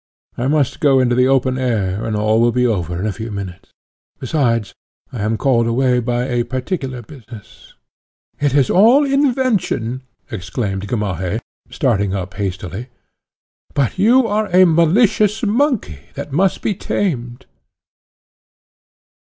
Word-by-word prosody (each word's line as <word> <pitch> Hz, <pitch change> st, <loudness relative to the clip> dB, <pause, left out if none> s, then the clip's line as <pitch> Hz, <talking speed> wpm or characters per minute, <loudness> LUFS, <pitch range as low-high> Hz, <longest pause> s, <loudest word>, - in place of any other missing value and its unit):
I 125 Hz, -, -2 dB
must 145 Hz, -2 st, +1 dB
go 135 Hz, -3 st, +4 dB
into 125 Hz, -1 st, +2 dB
the 125 Hz, +1 st, +3 dB
open 130 Hz, -1 st, +1 dB
air, 105 Hz, -6 st, -1 dB
and 110 Hz, -, -2 dB
all 110 Hz, +2 st, +2 dB
will 120 Hz, 0 st, +3 dB
be 125 Hz, +1 st, +1 dB
over 90 Hz, -7 st, -1 dB
in 95 Hz, -, -2 dB
a 110 Hz, -, 0 dB
few 110 Hz, +4 st, -6 dB
minutes. 100 Hz, -4 st, -7 dB, 0.5 s
Besides, 120 Hz, -5 st, -1 dB, 0.4 s
I 120 Hz, -, -4 dB
am 110 Hz, +2 st, 0 dB
called 120 Hz, -2 st, +2 dB
away 125 Hz, +1 st, +2 dB
by 120 Hz, 0 st, -1 dB
a 120 Hz, -2 st, -1 dB
particular 130 Hz, -1 st, -4 dB
business." 115 Hz, -5 st, -14 dB, 0.6 s
"It 145 Hz, -1 st, 0 dB
is 140 Hz, -3 st, +3 dB
all 240 Hz, +10 st, +5 dB
invention!" 255 Hz, -, 0 dB, 0.3 s
exclaimed 100 Hz, 0 st, -4 dB
Gamaheh, 100 Hz, -4 st, -2 dB, 0.3 s
starting 100 Hz, -, 0 dB
up 95 Hz, 0 st, -5 dB
hastily. 95 Hz, +2 st, -5 dB, 0.9 s
"But 140 Hz, -, 0 dB
you 240 Hz, +5 st, +5 dB
are 215 Hz, 0 st, 0 dB
a 185 Hz, 0 st, +5 dB
malicious 195 Hz, +6 st, +3 dB
monkey, 225 Hz, -, 0 dB, 0.2 s
that -, -, -6 dB
must 185 Hz, +6 st, +1 dB
be 210 Hz, -, +1 dB
tamed." 130 Hz, -11 st, -3 dB
125 Hz, 135 wpm, -18 LUFS, 110-165 Hz, 0.9 s, all